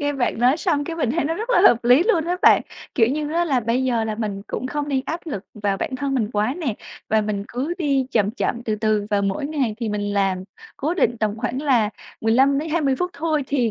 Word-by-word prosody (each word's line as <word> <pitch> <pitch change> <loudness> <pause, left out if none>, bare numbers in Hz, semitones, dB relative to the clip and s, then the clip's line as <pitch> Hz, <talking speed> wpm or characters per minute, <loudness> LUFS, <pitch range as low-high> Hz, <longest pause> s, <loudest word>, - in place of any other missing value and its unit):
nghe 290 0 0
bạn 255 -4 -1
nói 250 +4 +4
xong 310 -4 0
cái 330 - -5
mình 270 -8 0
thấy 325 +2 0
nó 325 +2 0
rất 445 +6 -4
là 425 - +5
hợp 240 0 +1
lý 250 +6 +6
luôn 355 -6 +2
á 355 +1 -1
bạn. - - +6 0.3
Kiểu 230 -5 +4
như 295 +4 -2
á, 340 +1 +2
là 270 -7 +1
bây 235 +3 0
giờ 235 -3 +1
là 220 -1 -2
mình 210 -3 -4
cũng 255 - -4
không 290 +2 -3
nên 270 -2 +1
áp 330 +2 -3
lực 210 - -5
vào 205 -2 -1
bản 260 - -3
thân 275 +1 -2
mình 220 -5 0
quá 210 +5 0
nè, 295 - -2 0.3
và 220 - +3
mình 210 -1 -2
cứ 280 +8 -3
đi 275 -6 +1
chậm 210 -3 +2
chậm 235 0 -2
từ 215 -2 -1
từ, 215 -1 0
và 205 - +2
mỗi 200 +9 -1
ngày 275 -8 -1
thì 230 - -1
mình 205 -1 -2
làm 195 -2 0 0.3
cố 310 +5 -1
định 240 -9 +1
tầm 215 -1 -1
khoảng 250 +4 -2
là 240 -7 +2 0.3
15 265 +5 +3
đến 310 +3 -3
20 300 -4 +1
phút 360 0 -1
thôi 305 -1 -1
thì 250 -5 +1
255 Hz, 260 wpm, -22 LUFS, 220-295 Hz, 0.3 s, lý